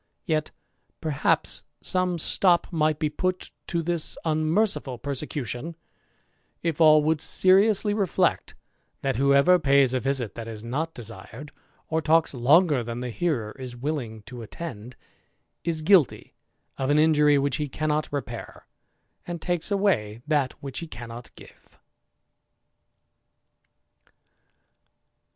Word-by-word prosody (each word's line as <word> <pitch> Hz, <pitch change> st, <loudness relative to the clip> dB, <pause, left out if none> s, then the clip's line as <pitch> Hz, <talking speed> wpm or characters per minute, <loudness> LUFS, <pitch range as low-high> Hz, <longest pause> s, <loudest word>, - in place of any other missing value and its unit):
Yet, 155 Hz, -3 st, 0 dB, 0.5 s
perhaps, 155 Hz, -4 st, 0 dB, 0.2 s
some 185 Hz, -1 st, 0 dB
stop 175 Hz, +2 st, +2 dB
t 155 Hz, -2 st, +2 dB
be 155 Hz, +1 st, -2 dB
put 185 Hz, +4 st, -3 dB, 0.2 s
to 170 Hz, -2 st, -1 dB
this 170 Hz, -1 st, -1 dB
unmerciful 155 Hz, -, 0 dB
persecution, 140 Hz, +2 st, -4 dB, 0.9 s
if 165 Hz, -1 st, -1 dB
all 155 Hz, -1 st, +7 dB
would 155 Hz, 0 st, +1 dB
jsly 200 Hz, +5 st, +4 dB
reflect, 195 Hz, -5 st, 0 dB, 0.5 s
that 135 Hz, -4 st, 0 dB
whoever 140 Hz, +7 st, +5 dB
pays 140 Hz, -4 st, +4 dB
a 130 Hz, -, +1 dB
visit 130 Hz, -3 st, -2 dB
that 115 Hz, -1 st, -7 dB
is 110 Hz, -1 st, -8 dB
not 150 Hz, +8 st, -3 dB
2d, 115 Hz, +5 st, -10 dB, 0.4 s
or 160 Hz, 0 st, 0 dB
talks 160 Hz, +1 st, +3 dB
longer 140 Hz, +2 st, +4 dB
than 120 Hz, +1 st, -5 dB
the 125 Hz, -1 st, -4 dB
hearer 125 Hz, -8 st, -1 dB
is 125 Hz, -2 st, -7 dB
willing 120 Hz, -5 st, -4 dB
to 120 Hz, +3 st, -9 dB
attend, 120 Hz, -1 st, -8 dB, 0.7 s
ilty 165 Hz, -1 st, +2 dB, 0.5 s
of 135 Hz, 0 st, -1 dB
an 145 Hz, -, +3 dB
injury 150 Hz, -2 st, +4 dB
which 140 Hz, -1 st, 0 dB
he 150 Hz, -2 st, -3 dB
cannot 155 Hz, +2 st, -1 dB
repair, 125 Hz, -5 st, -6 dB, 0.6 s
and 175 Hz, -1 st, -4 dB
takes 175 Hz, +1 st, -2 dB
that 145 Hz, -, 0 dB
which 135 Hz, -2 st, -5 dB
he 170 Hz, -, -7 dB
cannot 120 Hz, -3 st, -9 dB
give. -, -, -17 dB
150 Hz, 120 wpm, -25 LUFS, 125-165 Hz, 0.9 s, all